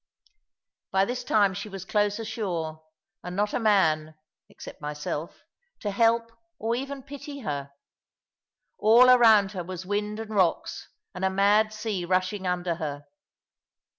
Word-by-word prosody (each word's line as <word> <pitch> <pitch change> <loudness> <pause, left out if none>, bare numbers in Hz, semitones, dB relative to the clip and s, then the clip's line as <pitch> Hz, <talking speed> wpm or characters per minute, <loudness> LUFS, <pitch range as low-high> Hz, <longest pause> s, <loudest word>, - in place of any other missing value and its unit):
By 195 0 +2
this 245 +3 -4
time 205 -5 +3
she 205 +3 -6
was 195 -2 -8
close 205 0 +1
ashore, 175 -8 -4 0.4
and 180 +1 -6
not 205 +1 0
a - - 0
man 160 -8 +2 0.3
(except - - -11
myself) 150 +2 -5 0.4
to 205 - -3
help 230 +2 +2 0.3
or 225 +2 -1
even 270 +1 -5
pity 285 +1 -8
her. 140 - -4 1.1
All 240 +4 +7
around 220 -5 +6
her 185 -4 -5
was 185 +1 -7
wind 210 +2 -2
and 220 -1 -6
rocks, 185 -5 0 0.2
and 180 - -6
a 190 - +3
mad 205 +3 +3
sea 215 -4 -3
rushing 185 +2 0
under 175 -2 -1
her. 145 -2 -5
200 Hz, 140 wpm, -26 LUFS, 180-220 Hz, 1.1 s, All